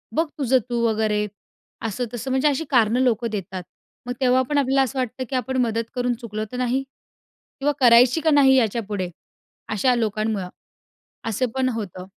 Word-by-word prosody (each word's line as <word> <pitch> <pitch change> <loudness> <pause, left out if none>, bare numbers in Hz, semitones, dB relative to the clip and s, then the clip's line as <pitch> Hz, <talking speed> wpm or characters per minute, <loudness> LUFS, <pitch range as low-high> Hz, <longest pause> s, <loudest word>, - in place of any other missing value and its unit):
"बघ 325 - +2
तुझं 260 -2 +3
तू 240 -1 -1
वगैरे." 215 -1 +1 0.6
असं-तसं 240 +3 -4
म्हणजे 265 +3 +2
अशी 295 +2 0
कारणं 235 -2 +3
लोकं 235 -2 +1
देतात. 190 -2 -5 0.4
मग 245 - -2
तेव्हा 255 0 +4
पण 295 - +1
आपल्याला 270 -1 +3
असं 265 +1 -3
वाटतं, 255 +1 -3
की 270 - -3
आपण 260 +1 -1
मदत 230 0 -1
करून 245 0 0
चुकलो 215 -2 -4
तर 250 - -5
नाही? 250 +2 0 0.8
किंवा 290 +2 +2
करायची 245 +4 +6
का 320 - +2
नाही 275 -2 +6
याच्यापुढे, 210 -6 0 0.6
अशा 230 +5 +2
लोकांमुळं? 215 -4 -1 0.8
असं 225 +4 0
पण 260 -1 +1
होतं. 200 -6 -5
245 Hz, 160 wpm, -23 LUFS, 215-260 Hz, 0.8 s, करायची